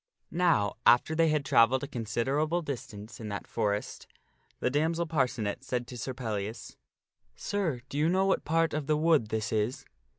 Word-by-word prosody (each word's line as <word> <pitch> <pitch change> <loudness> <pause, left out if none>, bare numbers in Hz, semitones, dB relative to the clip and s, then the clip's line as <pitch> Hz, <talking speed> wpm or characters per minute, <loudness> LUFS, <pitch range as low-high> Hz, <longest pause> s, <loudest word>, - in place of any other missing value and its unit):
Now, 165 - +2
after 120 +7 +5
they 165 +1 +3
had 150 -2 0
travelled 130 +1 +4
a - - -3
considerable 135 +7 -1
distance 120 -7 -7
in 110 -2 -6
that 100 0 -5
forest, 105 0 -2 0.5
the 125 - 0
damsel 165 +4 +1
Parcenet 125 -7 -1
said 125 -2 -2
to 125 - -9
Sir 130 +1 -5
Pellias, 110 -2 -4 0.3
" - - -64 0.2
Sir, 170 -12 -2
do 145 - -4
you 155 +2 +3
know 190 +2 +2
what 195 - +1
part 165 +1 +1
of 150 -2 -2
the 155 -1 +2
woods 155 -8 +3
this 110 -1 -2
is? 110 +4 -1
130 Hz, 175 wpm, -29 LUFS, 115-160 Hz, 0.5 s, after